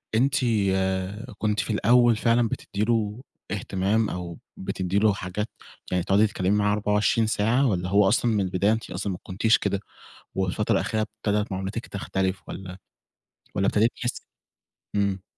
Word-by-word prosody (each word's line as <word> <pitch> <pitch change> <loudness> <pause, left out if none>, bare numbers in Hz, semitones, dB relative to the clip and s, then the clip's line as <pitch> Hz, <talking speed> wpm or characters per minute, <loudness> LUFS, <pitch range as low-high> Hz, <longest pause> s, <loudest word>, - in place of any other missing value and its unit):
أنتِ 135 +4 +3 1.0
كنتِ 105 -1 0
في 110 - -1
الأوَّل 120 +2 +5
فعلًا 115 +1 +2
بتدِّي 100 +1 -3
له 110 0 0 0.3
اهتمام، 100 +2 0
أو 90 -1 -6 0.2
بتدِّي 95 +1 -1
له 110 -1 +4
حاجات 105 +3 -4 0.4
يعني 90 -1 +1
تقعدي 100 +3 +4
تتكلَّمي 95 -1 -1
معاه 105 0 +2
24 105 +2 +2
ساعة، 115 +6 +2
والّا 90 -4 -1
هو 100 +1 +4
أصلًا 120 - +2
من 105 - +2
البداية 95 +3 +1
أنتِ 110 - -4
أصلًا 95 +2 -3
ما 90 - -7
كنتِيش 110 +4 +2
كده، 100 - -1 0.6
والفترة 95 +3 0
الأخيرة 110 +2 0 0.2
ابتدَت 105 0 +1
معاملتِك 95 +5 -4
تختلِف؟ 95 -1 -2
والّا 95 0 -7 0.8
والّا 100 0 +2
ابتدِيتِ 110 +3 +3
تحِسِّي 125 0 -4 0.7
إمم. 100 -2 0
105 Hz, 150 wpm, -25 LUFS, 95-110 Hz, 1.0 s, الأوَّل